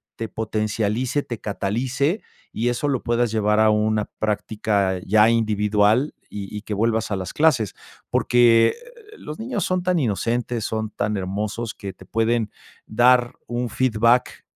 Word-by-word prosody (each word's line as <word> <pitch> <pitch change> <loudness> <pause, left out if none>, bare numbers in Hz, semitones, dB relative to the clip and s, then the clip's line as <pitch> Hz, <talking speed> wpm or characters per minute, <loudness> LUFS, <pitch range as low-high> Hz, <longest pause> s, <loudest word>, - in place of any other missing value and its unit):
te 115 - -4
potencialice, 110 +4 -1
te 120 -3 -6
catalice 125 - -1 0.3
y 120 +2 -1
eso 120 +4 -1
lo 135 -4 -1
puedas 120 -1 +1
llevar 105 -1 +2
a 110 0 +5
una 105 0 +1
práctica 105 -2 0
ya 110 +2 +5
individual 110 +2 +2
y 100 0 -7
y - - -6
que 110 - -5
vuelvas 110 +1 0
a - - +1
las 95 0 -5
clases, 140 -10 +2 0.3
porque, 120 -2 +4 0.5
los 150 - -8
niños 220 -4 -2
son 185 0 -1
tan 180 -1 +1
inocentes, 120 -1 -1
son 110 -1 -2
tan 105 0 -2
hermosos 105 +4 -3
que 100 -1 -7
te 95 - -16
pueden 115 +1 0 0.4
dar 120 +2 +3
un 120 0 -2
feedback 115 0 +2
110 Hz, 150 wpm, -22 LUFS, 105-120 Hz, 0.5 s, a